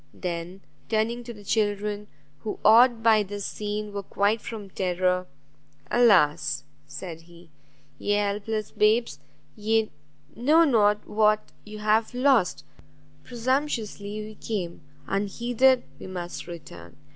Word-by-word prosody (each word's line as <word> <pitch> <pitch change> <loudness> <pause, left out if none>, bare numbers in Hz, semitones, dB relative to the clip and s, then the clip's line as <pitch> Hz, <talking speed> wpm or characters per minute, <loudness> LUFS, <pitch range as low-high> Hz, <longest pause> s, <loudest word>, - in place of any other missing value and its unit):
Then, 175 +2 -5 0.3
turning 230 +2 0
to 240 - -6
the 210 -3 -12
children, 205 0 -1 0.3
who, 215 - -5
awed 235 +1 +6
by 220 -2 +5
this 205 0 -5
scene, 210 0 -4
were 200 - -3
quiet 205 +3 0
from 210 -4 -8
terror. 180 0 0 0.6
"Alas!" 150 - +4 0.2
he - - -33
said, 165 0 -7
"ye 170 0 -17 0.7
helpless 210 +1 -2
babes, 220 +3 +2 0.4
ye 220 0 +1 0.4
know 300 +8 +5
not 210 -8 +3
what 215 0 +2
you 215 0 -9
have 215 +2 +1
lost: 245 - +2 0.6
presumptuously 230 - -2
we 215 - -9
came; 190 -6 -4 0.3
unheeded 240 +6 +2 0.2
we - - -8
must 175 -2 -6
return! 85 - -10
210 Hz, 120 wpm, -26 LUFS, 190-225 Hz, 0.7 s, awed